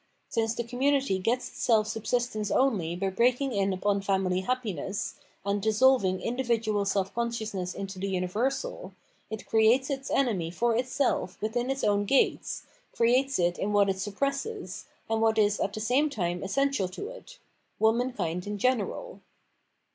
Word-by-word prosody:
Since 225 Hz, 0 st, 0 dB
the 235 Hz, -, -2 dB
community 260 Hz, -3 st, +1 dB
gets 240 Hz, +6 st, 0 dB
itself 220 Hz, -3 st, +2 dB
subsistence 220 Hz, 0 st, -1 dB
only 200 Hz, -11 st, +1 dB
by 190 Hz, +2 st, -1 dB
breaking 250 Hz, +6 st, +2 dB
in 200 Hz, -1 st, +1 dB
upon 200 Hz, +2 st, 0 dB
family 190 Hz, -2 st, +1 dB
happiness, 200 Hz, -, -2 dB, 0.3 s
and 200 Hz, 0 st, 0 dB
dissolving 220 Hz, -3 st, +3 dB
[individual] 230 Hz, -4 st, 0 dB
self 195 Hz, -1 st, 0 dB
consciousness 220 Hz, -6 st, -3 dB
into 195 Hz, -1 st, -6 dB
the 195 Hz, -, -2 dB
universal, 215 Hz, -, -2 dB, 0.4 s
it 220 Hz, -1 st, -6 dB
creates 230 Hz, +5 st, +3 dB
its 270 Hz, 0 st, -3 dB
enemy 210 Hz, -12 st, +1 dB
for 230 Hz, +7 st, +1 dB
itself 250 Hz, -5 st, 0 dB
within 240 Hz, +4 st, -1 dB
its 270 Hz, 0 st, -2 dB
own 205 Hz, 0 st, +2 dB
gates, 270 Hz, +6 st, +1 dB, 0.3 s
creates 255 Hz, +4 st, +3 dB
it 175 Hz, 0 st, +1 dB
in 210 Hz, +1 st, -1 dB
what 200 Hz, -1 st, +4 dB
it 190 Hz, 0 st, -1 dB
suppresses, 275 Hz, -, -3 dB, 0.2 s
and 225 Hz, -1 st, 0 dB
what 225 Hz, 0 st, +3 dB
is 210 Hz, -1 st, +3 dB
at 195 Hz, -, 0 dB
the 215 Hz, -, -5 dB
same 255 Hz, +8 st, +2 dB
time 175 Hz, -8 st, -2 dB
essen 275 Hz, +9 st, +1 dB
tial 195 Hz, -10 st, -2 dB
to 410 Hz, -, -5 dB
it -, -, -12 dB, 0.2 s
— -, -, -45 dB
womankind 220 Hz, -6 st, 0 dB
in 205 Hz, 0 st, -3 dB
general. 255 Hz, -, -1 dB
220 Hz, 155 wpm, -28 LUFS, 195-255 Hz, 0.4 s, what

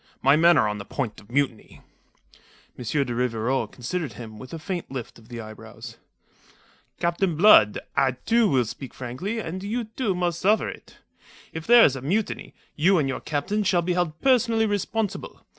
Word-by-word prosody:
My 140 Hz, +2 st, +6 dB
men 170 Hz, +2 st, +5 dB
are -, -, +3 dB
on 105 Hz, 0 st, -3 dB
the -, -, -6 dB
point 120 Hz, +1 st, -4 dB
of 100 Hz, -, -21 dB
mutiny." 130 Hz, -3 st, -2 dB, 0.9 s
M. -, -, -8 dB
de 125 Hz, +1 st, -1 dB
Rivarol 120 Hz, +1 st, 0 dB
considered 135 Hz, +2 st, -4 dB
him 110 Hz, 0 st, -10 dB
with 130 Hz, -, -10 dB
a 165 Hz, -, -5 dB
faint 175 Hz, +1 st, -5 dB
lift 125 Hz, -3 st, -7 dB
of 110 Hz, +1 st, -20 dB
the 120 Hz, -1 st, -7 dB
eyebrows. 110 Hz, -1 st, -10 dB, 1.0 s
"Captain 170 Hz, 0 st, 0 dB
Blood, 150 Hz, -, +6 dB, 0.2 s
I, 130 Hz, -1 st, +3 dB
too, 225 Hz, -, +2 dB
will 130 Hz, -4 st, +2 dB
speak 130 Hz, +4 st, -8 dB
frankly; 130 Hz, -, -4 dB
and 185 Hz, -3 st, -5 dB
you, 230 Hz, +4 st, -2 dB
too, 220 Hz, -2 st, -2 dB
must 175 Hz, -1 st, -1 dB
suffer 210 Hz, +4 st, +2 dB
it. -, -, -10 dB, 0.6 s
If 160 Hz, 0 st, -7 dB
there 240 Hz, 0 st, +8 dB
is 135 Hz, -, +2 dB
a 130 Hz, -, -6 dB
mutiny, 195 Hz, -, -2 dB, 0.2 s
you 180 Hz, +5 st, +4 dB
and 145 Hz, -4 st, +1 dB
your 135 Hz, -, -3 dB
captains 195 Hz, +8 st, -1 dB
shall 175 Hz, -2 st, +2 dB
be 180 Hz, +1 st, 0 dB
held 175 Hz, -3 st, -1 dB
personally 235 Hz, -4 st, +3 dB
responsible. 210 Hz, 0 st, -3 dB
160 Hz, 180 wpm, -25 LUFS, 125-200 Hz, 1.0 s, there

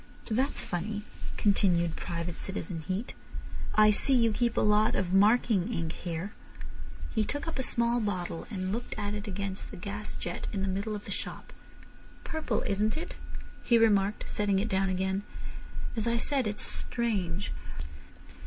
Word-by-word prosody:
"That's 260 Hz, +6 st, +1 dB
funny," 205 Hz, +4 st, -3 dB, 0.3 s
continued 175 Hz, -5 st, +3 dB
Private 170 Hz, -1 st, -4 dB
Citizen 190 Hz, -3 st, -4 dB
Heat. 195 Hz, +5 st, -2 dB, 0.6 s
"I 215 Hz, 0 st, +7 dB
see 265 Hz, +6 st, +4 dB
you 230 Hz, -2 st, +5 dB
keep 235 Hz, +1 st, +1 dB
a -, -, +5 dB
lot 210 Hz, 0 st, +4 dB
of 185 Hz, -1 st, 0 dB
marking 210 Hz, 0 st, +4 dB
ink 165 Hz, -7 st, -1 dB
here—" 175 Hz, +3 st, -4 dB, 0.8 s
He -, -, +3 dB
took 290 Hz, +8 st, -3 dB
up 325 Hz, -, -3 dB
a -, -, +3 dB
small 235 Hz, -1 st, +3 dB
bottle, 185 Hz, -6 st, -2 dB
and 185 Hz, -4 st, -2 dB
looked 235 Hz, +2 st, -3 dB
at 205 Hz, -1 st, -1 dB
it 210 Hz, 0 st, -4 dB
against 200 Hz, 0 st, -3 dB
the 200 Hz, -, -8 dB
gas 205 Hz, +3 st, -4 dB
jet 175 Hz, -, -4 dB
in 195 Hz, -2 st, -1 dB
the -, -, 0 dB
middle 200 Hz, +3 st, -1 dB
of 205 Hz, -, -7 dB
the -, -, -6 dB
shop. -, -, -5 dB, 0.7 s
"Purple—isn't 215 Hz, -7 st, 0 dB
it?" 335 Hz, -, -5 dB, 0.5 s
he 235 Hz, -, +5 dB
remarked, 210 Hz, -2 st, +3 dB
setting 205 Hz, -2 st, +2 dB
it 210 Hz, +4 st, +1 dB
down 190 Hz, 0 st, +2 dB
again. 190 Hz, +1 st, 0 dB, 0.7 s
"As 225 Hz, 0 st, 0 dB
I 235 Hz, 0 st, +2 dB
said, 265 Hz, 0 st, +1 dB
it's 210 Hz, 0 st, +1 dB
strange. 200 Hz, -6 st, +1 dB
205 Hz, 160 wpm, -30 LUFS, 190-225 Hz, 0.8 s, I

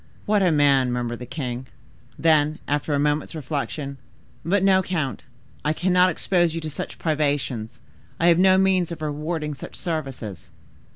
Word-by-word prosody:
"What 210 Hz, -1 st, +2 dB
a 180 Hz, -3 st, +4 dB
man!" 140 Hz, -4 st, +4 dB
murmured 120 Hz, -1 st, -2 dB
the 125 Hz, -, -8 dB
king. 130 Hz, -1 st, -4 dB, 0.5 s
Then, 155 Hz, -1 st, +3 dB
after 145 Hz, +1 st, 0 dB
a -, -, +1 dB
moment's 150 Hz, +2 st, 0 dB
reflection,—"But 145 Hz, +5 st, -4 dB
no, 190 Hz, -1 st, +5 dB
count, 160 Hz, -8 st, -2 dB, 0.4 s
I 150 Hz, -, +1 dB
cannot 180 Hz, +2 st, +3 dB
expose 175 Hz, -1 st, +1 dB
you 165 Hz, -, -3 dB
to 155 Hz, -1 st, -5 dB
such -, -, -6 dB
privations. 140 Hz, -7 st, -1 dB, 0.4 s
I 165 Hz, -, +2 dB
have 170 Hz, 0 st, +5 dB
no 190 Hz, 0 st, +6 dB
means 190 Hz, -2 st, +2 dB
of 160 Hz, -2 st, -6 dB
rewarding 150 Hz, +1 st, -3 dB
such 135 Hz, -, -9 dB
services." 135 Hz, -, -5 dB
150 Hz, 155 wpm, -24 LUFS, 135-175 Hz, 0.5 s, no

